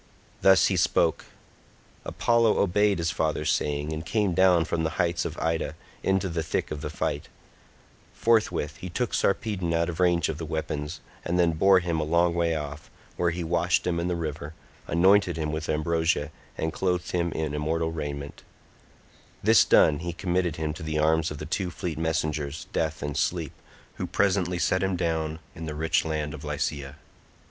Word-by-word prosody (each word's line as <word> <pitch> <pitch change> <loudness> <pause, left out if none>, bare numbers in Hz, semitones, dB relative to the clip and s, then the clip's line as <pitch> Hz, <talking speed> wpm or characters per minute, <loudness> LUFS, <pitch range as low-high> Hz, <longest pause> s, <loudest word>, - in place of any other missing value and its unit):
Thus 95 -1 +6
he 95 - +1
spoke. 85 - +2 0.8
Apollo 115 -2 +2
obeyed 100 +1 +3
his 85 -1 0
father's 75 -1 0
saying, 75 +1 -1
and 80 +1 -4
came 100 +2 0
down 90 -2 +4
from 80 - -1
the 80 - +1
heights 85 -1 +1
of - - -5
Ida 80 -2 -1 0.3
into 95 0 +1
the 85 -2 -2
thick 80 - -2
of 75 - -4
the 75 - -4
fight; - - -3 0.8
forthwith 105 -10 +1
he 90 +1 -7
took 120 +7 -2
Sarpedon 95 -4 0
out 85 +1 +1
of 85 - -6
range 85 -2 +3
of 80 -1 -4
the 80 - -4
weapons, 80 0 -4 0.2
and 90 - -1
then 85 -2 +4
bore 95 +3 +4
him 85 -2 -1
a - - 0
long 85 +2 +2
way 85 -1 +1
off, 75 0 -6 0.3
where 85 - +1
he 85 +1 -3
washed 85 +1 +1
him 85 -1 0
in 85 - -1
the 90 - 0
river, 80 -2 -5 0.3
anointed 90 +1 +4
him 75 -1 -2
with 80 0 -4
ambrosia 80 -1 0 0.3
and 80 0 -2
clothed 90 -2 -1
him 85 -1 0
in 80 -2 -2
immortal 80 +2 -1
raiment; 70 -3 -5 1.0
this 110 +2 +6
done, 75 -2 +5
he 85 +1 -4
committed 90 -1 -1
him 75 -1 -2
to 80 - -10
the 80 -1 -2
arms 80 +1 +2
of 75 - -6
the 75 - -6
two 95 +3 -2
fleet 85 -3 -5
messengers, 80 -2 -2
Death, 80 -2 -1
and 75 -1 -3
Sleep, 85 -5 -1 0.4
who - - -3
presently 90 -3 +1
set 95 +1 +1
him 95 -1 0
down 80 -2 -1 0.2
in 80 -3 -7
the 75 - -4
rich 80 +2 +1
land 75 -2 -2
of 75 0 -9
Lycia. 70 -2 -3
80 Hz, 185 wpm, -26 LUFS, 75-90 Hz, 1.0 s, Thus